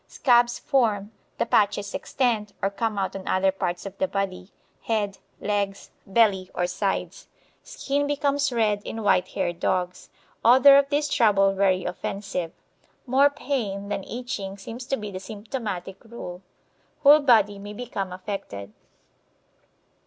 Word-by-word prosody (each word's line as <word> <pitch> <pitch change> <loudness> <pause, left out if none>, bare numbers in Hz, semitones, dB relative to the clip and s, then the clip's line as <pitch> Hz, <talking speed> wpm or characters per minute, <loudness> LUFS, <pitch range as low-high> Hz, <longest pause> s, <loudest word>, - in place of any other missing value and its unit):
Scabs 240 -2 +3
form, 220 -7 0 0.3
the - - +1
patches 205 -2 +1
extend, 225 -6 -1
or 195 0 0
come 215 +1 -2
out 195 -1 -2
on 195 - -7
other 190 +1 +2
parts 175 -1 -3
of 195 -1 -7
the 285 - +1
body, 195 -4 -3 0.4
head, 205 -3 -1 0.2
legs, 200 -1 -2 0.2
belly, 195 -3 +3
or 180 - +1
sides. 190 +2 -3 0.3
Skin 285 - -2
becomes 285 -1 0
red 215 -4 +1
in 225 0 -5
white 185 -2 +3
haired 175 -2 -3
dogs. 180 0 -1 0.3
Odour 265 +4 +8
of 280 0 +3
this 295 +1 +1
trouble 195 -7 +3
very 190 -1 +2
offensive. 180 -1 -4 0.5
More 270 +2 +4
pain 225 -9 -3
than 200 -1 -2
itching 220 -5 -5
seems 230 +5 -8
to 270 - 0
be 210 -1 -6
the 185 - -5
symptomatic 205 -3 -6
rule. 205 -6 -8 0.6
Whole 295 +2 +8
body 215 -8 +4
may 205 +1 -8
become 205 -5 -5
affected. 180 - -6
205 Hz, 140 wpm, -25 LUFS, 195-245 Hz, 0.6 s, Odour